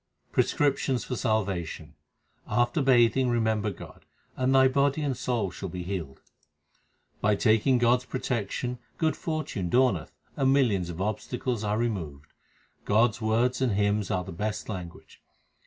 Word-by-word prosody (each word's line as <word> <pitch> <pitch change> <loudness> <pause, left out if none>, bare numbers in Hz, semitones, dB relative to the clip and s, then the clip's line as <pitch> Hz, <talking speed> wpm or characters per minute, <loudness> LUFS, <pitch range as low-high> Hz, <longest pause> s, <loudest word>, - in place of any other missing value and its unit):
Prescriptions 135 -3 +1
for 125 - -4
salvation: 95 -9 -2 0.5
After 120 +4 +1
bathing 130 -1 +4
remember 110 -3 +1
God, 95 - -11 0.3
and 130 +1 +1
thy 130 0 +7
body 140 +3 +1
and 140 -3 -1
soul 115 -6 -1
shall 95 +1 -6
be 90 +1 -5
healed. 85 -7 -5 1.0
By 105 0 +3
taking 115 +5 +3
God 120 +1 +4
s 125 - -15
protection 125 -1 -3 0.2
good 160 -2 +1
fortune 155 - -3
dawneth, 120 -8 +2 0.2
and 135 -1 +2
millions 110 -11 +2
of 85 +1 -5
obstacles 115 +2 -2
are 105 0 0
removed. 85 -12 -4 0.5
God 110 +3 +3
s 110 - -12
words 115 +4 +1
and 125 -5 +2
hymns 105 0 +1
are 90 - 0
the 95 - -8
best 105 +6 -4
language. 90 -5 -8
110 Hz, 145 wpm, -27 LUFS, 100-130 Hz, 1.0 s, thy